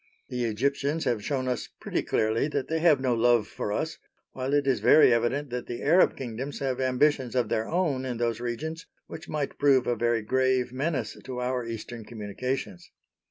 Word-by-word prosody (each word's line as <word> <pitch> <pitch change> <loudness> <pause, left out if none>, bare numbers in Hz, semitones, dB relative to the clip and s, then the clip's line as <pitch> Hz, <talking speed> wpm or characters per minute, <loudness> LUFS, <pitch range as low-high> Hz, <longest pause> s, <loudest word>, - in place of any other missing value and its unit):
The 125 -1 -2
Egyptians 140 +7 0
have 120 -5 0
shown 130 0 -1
us 125 -1 -2
pretty - - -2
clearly 110 +5 +1
that 145 -3 -2
they 160 0 -1
have 160 -4 +5
no 130 -2 +1
love 120 -1 +3
for 105 - -4
us, 155 +9 -2 0.3
while 130 +1 -3
it 145 -1 +2
is 135 -2 +2
very 140 -5 +6
evident 125 +4 0
that 125 0 -4
the 120 - -5
Arab 170 +6 +4
kingdoms 130 +2 -5
have 135 -2 -2
ambitions 130 0 +1
of 120 -4 +1
their 110 0 0
own 160 -7 0
in 125 -2 -3
those 115 -1 -1
regions, 155 +8 -4 0.2
which 160 +2 -10
might 150 -2 -3
prove 135 -3 +4
a 120 - +1
very 115 -1 +1
grave 130 +1 +1
menace 140 +2 -2
to 130 -1 -5
our 125 -1 -2
eastern 115 0 -6
communications. 105 -1 -5
130 Hz, 190 wpm, -27 LUFS, 120-140 Hz, 0.3 s, very